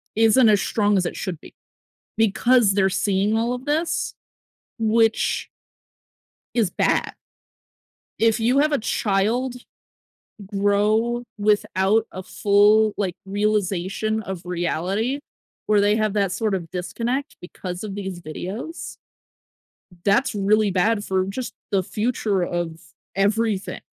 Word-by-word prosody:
isn't 225 +2 +5
as 205 -2 +4
strong 205 -2 +1
as 185 - +1
it - - -3
should 180 -6 -4
be. - - -14 0.6
Because 225 +1 +3
they're 190 -1 +3
seeing 200 +3 +1
all 230 +2 0
of 250 +1 -7
this, 315 +3 -1 0.7
which 225 0 +2 1.1
is 220 -6 +2
bad. - - 0 1.1
If 225 0 +3
you 245 +5 +3
have 305 +1 +3
a 290 - +2
child 225 +4 0 0.9
grow 210 +4 +1 0.2
without 210 +1 +2
a 185 - -6
full, 210 +3 +4
like, 190 -4 -2
realization 205 +1 -1
of 190 -4 -6
reality, 180 - -1 0.5
where 210 -1 +4
they 205 +1 +3
have 215 -2 0
that 200 -3 +1
sort 215 -1 -1
of 170 -4 -4
disconnect 240 +10 -3
because 180 +2 -7
of 200 -2 -5
these 190 -3 -5
videos 195 - -6 1.1
that's 210 +5 +2
really 205 +1 +2
bad 205 +3 +1
for 190 -2 0
just 235 +6 -5 0.2
the 195 -2 +2
future 210 -1 -1
of 175 -2 -3 0.4
everything. 205 0 0
205 Hz, 125 wpm, -23 LUFS, 190-225 Hz, 1.1 s, isn't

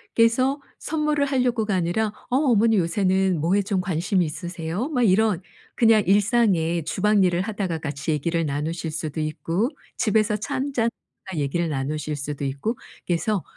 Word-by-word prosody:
그래서 255 +5 +3 0.2
선물을 300 -2 0
하려고가 245 -6 +1
아니라 180 +5 +1 0.2
"어 250 - 0
어머니 230 -6 +3
요새는 190 0 +1
뭐에 180 +6 +2
좀 195 -1 -1
관심이 180 +1 0
있으세요?" 175 - -4
막 250 -6 +1
이런 205 -2 +3 0.3
그냥 225 -3 +5
일상에 195 -5 +2
주방 205 +5 +2
일을 175 0 +2
하다가 195 -5 -2
같이 150 +1 -3
얘기를 165 +3 0
나누실 155 +3 -3
수도 155 -1 -4
있고 165 +8 -1 0.3
집에서 215 -1 +2
차 240 +7 -4
1 275 +1 -2
잔 230 -2 +2 0.4
하다가 190 -5 -4
얘기를 165 +4 -1
나누실 150 +2 -2
수도 145 0 -5
있고 140 - -2 0.3
그래서 180 +3 0
190 Hz, 345 characters per minute, -24 LUFS, 165-225 Hz, 0.4 s, 그냥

